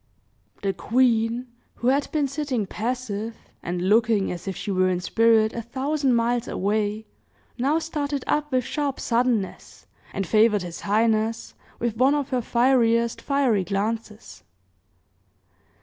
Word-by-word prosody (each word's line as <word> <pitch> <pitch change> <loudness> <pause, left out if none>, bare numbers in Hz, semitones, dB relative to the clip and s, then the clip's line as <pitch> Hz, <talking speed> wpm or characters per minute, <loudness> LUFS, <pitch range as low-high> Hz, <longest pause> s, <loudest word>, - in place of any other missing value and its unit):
The 195 -1 0
queen, 235 0 +1 0.3
who 240 - 0
had 275 +2 +1
been 295 -3 +1
sitting 275 -6 -2
passive, 225 0 -3 0.3
and 175 +1 -3
looking 220 -1 +3
as 175 +2 -7
if 190 - -3
she 205 - -4
were 185 -1 +2
in 180 -1 0
spirit 220 +3 +3
a 235 - -3
thousand 265 +3 0
miles 235 +1 +1
away, 210 +2 -1 0.5
now 280 +6 +2
started 295 -4 -3
up 295 0 0
with 255 -1 +2
sharp 285 +1 -2
suddenness, 235 -5 -1 0.3
and 195 - -3
favored 215 0 +3
his 175 -1 -7
highness 220 +1 0 0.2
with 230 -2 -2
one 265 +4 +4
of 285 -2 -2
her 255 -2 0
fieriest 235 -1 +2
fiery 265 -8 +1
glances. 210 - -4
230 Hz, 135 wpm, -24 LUFS, 210-260 Hz, 0.5 s, one